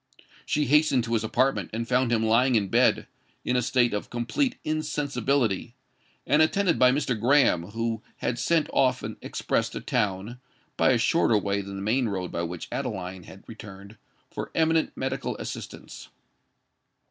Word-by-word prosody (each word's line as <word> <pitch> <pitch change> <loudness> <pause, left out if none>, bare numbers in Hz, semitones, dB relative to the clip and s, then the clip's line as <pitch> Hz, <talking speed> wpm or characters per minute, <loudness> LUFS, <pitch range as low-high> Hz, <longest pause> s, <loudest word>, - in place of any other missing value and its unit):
She 150 - +1
hastened 145 -2 +3
to 115 0 -3
his 110 -2 +1
apartment, 110 -4 0
and 115 +1 -3
found 125 0 +1
him 110 -1 +2
lying 120 +3 +3
in 100 -3 +1
bed—in 125 - 0
a 125 - +3
state 120 -1 +2
of 105 - -3
complete 120 - -1
insensibility—and 140 -2 -2
attended 180 +2 +2
by 125 0 +6
Mr. 135 -2 0
Graham, 120 -8 +3
who 115 +1 -3 0.2
had 120 -1 -2
sent 160 +6 +2
off 130 - +2
an - - -6
express - - -1
to - - -6
town 105 +4 -2 0.4
(by - - +3
a 130 - +4
shorter 115 -1 +3
way 100 0 -1
than 100 0 -8
the 100 - -5
main 120 +4 +1
road 95 -3 -4
by 85 - -2
which 85 0 -5
Adeline 95 -8 -4
had 95 - -13
returned) 100 -2 -11 0.4
for - - -5
eminent 160 0 +2
medical 130 0 -3
assistance. - - -8
120 Hz, 160 wpm, -26 LUFS, 105-135 Hz, 0.4 s, by